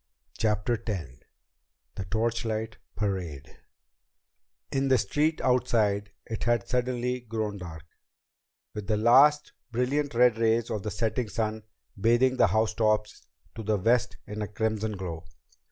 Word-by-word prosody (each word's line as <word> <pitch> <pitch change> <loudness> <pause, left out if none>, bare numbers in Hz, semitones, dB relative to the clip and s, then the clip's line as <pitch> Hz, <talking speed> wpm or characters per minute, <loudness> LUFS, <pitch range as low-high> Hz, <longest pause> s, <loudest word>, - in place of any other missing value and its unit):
CHAPTER 110 +1 0
X 90 - -3 0.8
The 95 - -5
Torchlight 110 +1 -2 0.2
Parade 90 -8 -4 1.1
In 135 0 +1
the 130 -1 +5
street 150 +9 +1
outside 105 -5 +2 0.2
it 110 0 -4
had 120 -4 +1
suddenly 125 0 -1
grown 110 -3 -3
dark, 80 -3 -8 0.9
with 105 -2 -6
the 105 0 +1
last, 140 +7 +5 0.2
brilliant 130 +3 0
red 120 -2 +4
rays 115 0 +2
of 105 - -2
the 105 - -3
setting 115 +2 -1
sun 110 0 -2 0.3
bathing 120 +5 +3
the - - +5
housetops 110 -1 0 0.3
to 115 - -7
the 110 -1 +1
west 115 +5 +1
in 105 0 -6
a 105 - -2
crimson 110 0 -1
glow. 85 -3 -5
110 Hz, 130 wpm, -28 LUFS, 105-120 Hz, 1.1 s, the